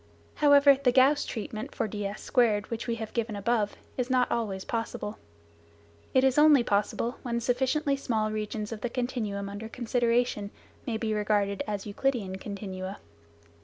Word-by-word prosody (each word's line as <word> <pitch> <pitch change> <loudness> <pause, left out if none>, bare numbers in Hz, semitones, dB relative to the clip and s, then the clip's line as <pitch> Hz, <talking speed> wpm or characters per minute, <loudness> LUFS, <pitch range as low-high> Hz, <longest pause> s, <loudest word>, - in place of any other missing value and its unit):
However, 285 -2 +6
the 255 -3 +4
Gauss 270 +3 +4
treatment 220 -1 -5
for - - 0
ds2 210 +2 0
which 230 +1 -4
we 235 - 0
have 220 -1 -6
given 230 -2 -2
above 210 0 0 0.2
is 250 0 -1
not 255 -1 +2
always 200 -5 -2
possible. 225 -2 -4 1.0
It 260 - +5
is 265 +1 +4
only 300 -4 +7
possible 220 +3 0
when 235 -2 -2
sufficiently 265 +5 +1
small 220 -6 -1
regions 215 0 -3
of 220 -2 -6
the 245 - -2
continuum 225 -5 -3
under 205 +2 -6
consideration 240 -3 0 0.4
may 230 -3 -1
be 220 -1 -1
regarded 205 -1 +1
as 205 -2 -3
Euclidean 205 -3 -1
continua. 190 -1 -6
225 Hz, 150 wpm, -28 LUFS, 205-250 Hz, 1.0 s, only